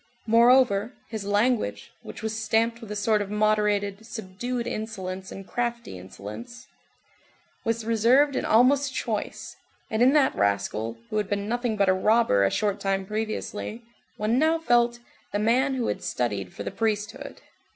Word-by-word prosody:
Moreover, 235 -1 +4
his 220 -3 -5
language, 205 - 0
which - - -10
was 220 0 -2
stamped 225 +2 0
with 225 - -10
a 210 - -4
sort 210 +1 +2
of 200 - -4
moderated, 210 -1 +1
subdued 235 +3 -5
insolence 190 -5 -5
and 195 - -8
crafty 235 - -3
insolence, 105 - -9 1.0
was 230 0 -1
reserved 245 +6 +4
and - - -1
almost 265 +4 +3
choice, 220 -5 -4 0.4
and 220 - 0
in 255 +3 +6
that 290 -3 +4
rascal, 100 +3 -1
who 215 - -1
had 210 -2 -1
been 200 0 -2
nothing 240 -1 -1
but 200 -1 +3
a 185 - +5
robber 200 - +3
a 100 - +4
short 205 - -1
time 195 -1 -1
previously, 215 +2 -4 0.3
one 220 +4 +1
now 320 +2 +3
felt 240 -6 +2 0.4
"the - - +1
man 250 +6 +2
who 245 -3 -1
had - - -2
studied 100 -7 -2
for 100 - -7
the 100 - -4
priesthood." 210 -2 -3
215 Hz, 160 wpm, -26 LUFS, 195-235 Hz, 1.0 s, in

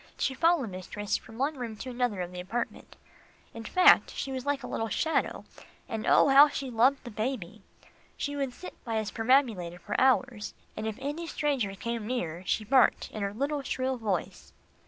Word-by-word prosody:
She 270 - 0
followed 315 - +2
mistress 200 +3 -3
from 225 - -7
one 280 +3 -1
room 230 -3 -4
to 255 +4 -6
another 240 -6 -1
of 175 0 -4
the 180 - -7
apartment 225 +7 -5 0.6
in 230 - -7
fact, 365 +11 +6
she 270 - -3
was 260 +1 -5
like 285 -2 0
a - - -5
little 225 -1 -2
shadow, 320 +8 0 0.4
and 220 -1 -4
oh! - - +6
how 280 +2 +8
she 275 -2 -4
loved 250 +4 +3
the 240 - -8
baby. 215 -3 -4 0.6
She 285 0 -3
would 275 -2 -1
sit 365 - -11
by 230 -2 -3
his 215 -1 -2
perambulator 225 -8 +2
for 205 +4 -6
hours, 255 -4 +2 0.2
and 215 +1 -4
if 220 - -4
any 295 +5 -4
stranger 270 -12 -1
came 230 +1 -4
near, 175 -9 -3
she 220 - +1
barked 255 +4 +3
in 215 - -6
her 200 0 -1
little, 280 +6 -2
shrill 260 -1 -2
voice. 205 -6 -3
240 Hz, 190 wpm, -29 LUFS, 215-275 Hz, 0.6 s, how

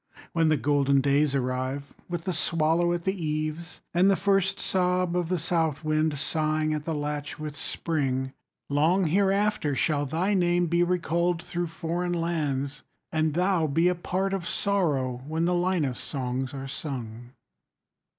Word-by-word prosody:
When 165 -1 +3
the 155 - +3
golden 140 +1 +3
days 140 +1 +2
arrive, 130 +2 -2 0.2
With 175 -2 -3
the 185 - -2
swallow 165 +1 +2
at 175 -1 -1
the 190 - +1
eaves, 155 +2 -3
And 180 +3 +5
the 195 - +5
first 195 -1 +1
sob 180 -1 +1
of 175 -2 0
the 180 - +1
south 160 -2 0
wind 155 -1 +1
Sighing 155 +1 0
at 150 -1 -3
the 160 - -1
latch 145 0 -3
with 150 -1 -6
spring, 135 -3 -2 0.4
40 - - -5
Long 165 +7 +3
hereafter 195 -3 +2
shall 145 0 +1
thy 175 +8 0
name 175 -2 +3
Be 170 +1 +2
recalled 175 -1 +1
through 175 -1 -3
foreign 170 +2 -2
lands, 150 -4 -1 0.3
And 155 -1 +1
thou 180 -2 +2
be 165 +5 +2
a - - +2
part 190 +2 -2
of 185 -3 -2
sorrow 145 -11 0
When 160 +2 0
the 180 - +2
Linus 175 -7 0
songs 130 -1 -3
are 135 -1 -6
sung. 120 -4 -6
160 Hz, 160 wpm, -27 LUFS, 145-175 Hz, 0.4 s, And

